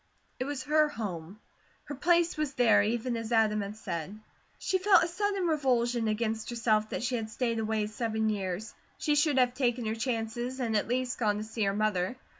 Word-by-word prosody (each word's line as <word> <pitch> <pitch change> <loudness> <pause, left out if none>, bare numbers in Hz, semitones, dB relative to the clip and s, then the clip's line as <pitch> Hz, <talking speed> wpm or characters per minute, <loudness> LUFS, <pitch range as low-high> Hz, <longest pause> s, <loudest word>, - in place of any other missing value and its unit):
It 255 - -1
was 280 -2 -4
her 305 +2 +3
home. 195 - -6 0.4
Her - - -7
place 340 +4 +2
was 305 -3 -2
there, 220 -4 +5
even 235 +3 -1
as 230 0 -5
Adam 215 -2 +3
had 200 +1 -5
said. 185 0 -5 0.4
She 375 - 0
felt 385 +1 +5
a - - 0
sudden 395 +1 -1
revulsion 245 -7 +1
against 220 0 -1
herself 220 -2 +1
that - - -3
she 250 +1 -1
had 220 -1 -4
stayed 230 0 -1
away 220 -1 0
seven 220 0 -2
years; 200 -1 -3 0.2
she 300 - +1
should 295 -1 +3
have 250 -1 +3
taken 245 -2 0
her 215 - 0
chances 240 +2 -3
and 230 -3 -1
at 210 - +1
least 250 +1 -1
gone 210 -3 +1
to 210 - -3
see 220 0 -2
her 195 - +1
mother. 210 -1 0
230 Hz, 200 wpm, -29 LUFS, 215-260 Hz, 0.4 s, there